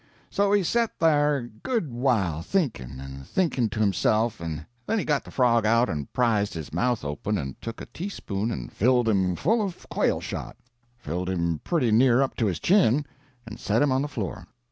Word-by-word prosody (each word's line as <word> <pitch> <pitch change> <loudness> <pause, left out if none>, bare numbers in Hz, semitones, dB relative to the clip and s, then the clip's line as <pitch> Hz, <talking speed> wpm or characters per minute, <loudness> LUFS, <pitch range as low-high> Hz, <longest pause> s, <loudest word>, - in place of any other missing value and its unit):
"So 200 0 +2
he 205 -1 +4
set 230 +5 0
there 150 -2 +3
a 120 -3 -5
good 155 - -3
while 110 - +1
thinking 85 - -2
and 70 0 -8
thinking 135 - 0
to 100 - -5
himself 110 +3 +2
and 80 -2 -5 0.2
then 225 - +1
he 200 - -1
got 150 -2 +1
the - - -12
frog 120 -3 +3
out 115 +1 +3
and 75 -5 -4
prized 110 -6 +1
his 80 -3 -7
mouth 125 -9 0
open 75 +9 -2
and 65 -6 -6
took 115 0 -6
a - - -6
teaspoon 115 - -4
and 60 - -5
filled 125 +1 +2
him 95 -4 +2
full 225 - +2
of 195 -4 -5
quail - - +1
shot - - -6 0.4
filled 90 -5 -4
him 85 -3 -1
pretty 140 -10 +1
near 120 +2 +5
up 135 - -3
to 115 - +1
his 90 -5 -1
chin 150 - +3 0.4
and 115 0 -9
set 110 +6 +2
him 145 - +2
on 130 +1 +2
the 145 - -1
floor. 95 -10 -5
115 Hz, 200 wpm, -26 LUFS, 90-145 Hz, 0.4 s, near